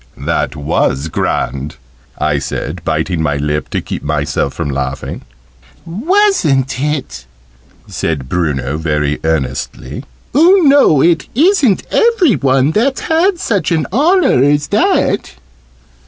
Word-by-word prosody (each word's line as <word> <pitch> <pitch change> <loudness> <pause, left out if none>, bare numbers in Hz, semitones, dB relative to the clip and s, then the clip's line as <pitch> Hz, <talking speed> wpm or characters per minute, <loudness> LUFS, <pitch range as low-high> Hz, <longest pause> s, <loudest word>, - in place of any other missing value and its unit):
"That - - -2
was 70 0 -1
grand!" 70 -1 -2 0.4
I 75 -1 0
said, 75 +4 -5
biting 80 +2 -1
my 75 -2 0
lip 75 +1 -2
to - - -2
keep - - -6
myself 75 -2 -2
from 75 -4 -3
laughing. 65 0 -4 0.6
"Wasn't 175 - +1
it?" 130 - -3 0.6
said 75 -6 -3
Bruno, 75 -4 -2
very 75 -2 -1
earnestly. 65 -5 -3 0.3
"Oo 355 +5 +5
know 275 - +5
it 170 -1 +2
isn't 295 - +3
every 450 - +3
one 135 +1 +2
that's 260 - 0
had 345 +3 +1
such 195 - -1
an 160 -2 +1
honour 320 - +3
as 145 +1 +1
that!" - - +1
130 Hz, 120 wpm, -14 LUFS, -, 0.6 s, Oo